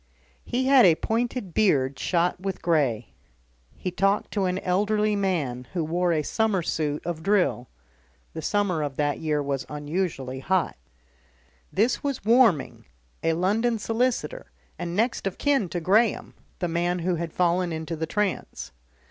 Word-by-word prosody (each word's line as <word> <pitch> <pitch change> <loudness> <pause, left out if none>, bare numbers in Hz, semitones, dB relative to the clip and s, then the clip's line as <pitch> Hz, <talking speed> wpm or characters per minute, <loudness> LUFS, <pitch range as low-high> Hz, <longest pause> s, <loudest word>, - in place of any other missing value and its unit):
He 255 +1 -1
had 270 -2 +7
a 170 -5 +6
pointed 230 -2 -2
beard 140 -11 +2
shot 175 0 +1
with 195 -1 -4
grey. 135 -10 +1 0.6
He 185 - -4
talked 195 +3 +1
to 200 -3 0
an 180 0 0
elderly 210 +3 +1
man 150 -11 -1
who 175 -3 0
wore 175 +3 0
a 155 -2 +1
summer 215 0 0
suit 150 -2 -2
of 170 -2 -3
drill 180 - +1 0.6
(the 160 - -5
summer 195 -2 0
of 145 -2 -3
that 145 0 0
year 150 -2 0
was 140 -1 -2
unusually 150 -3 -3
hot). 185 +5 0 1.0
This 225 +6 +1
was 275 -7 -3
Warming, 225 - +3 0.4
a 165 - +1
London 215 +7 +1
solicitor 250 - -1 0.3
and 170 0 -4
next 225 -1 0
of 195 - -4
kin 275 -10 +1
to 175 - -2
Graham, 205 +6 +2 0.2
the 175 - -1
man 175 +1 0
who 180 - +2
had 170 0 -4
fallen 175 0 +1
into 160 +1 -4
the 160 0 -3
trance. 210 -2 -2
180 Hz, 155 wpm, -25 LUFS, 160-210 Hz, 1.0 s, had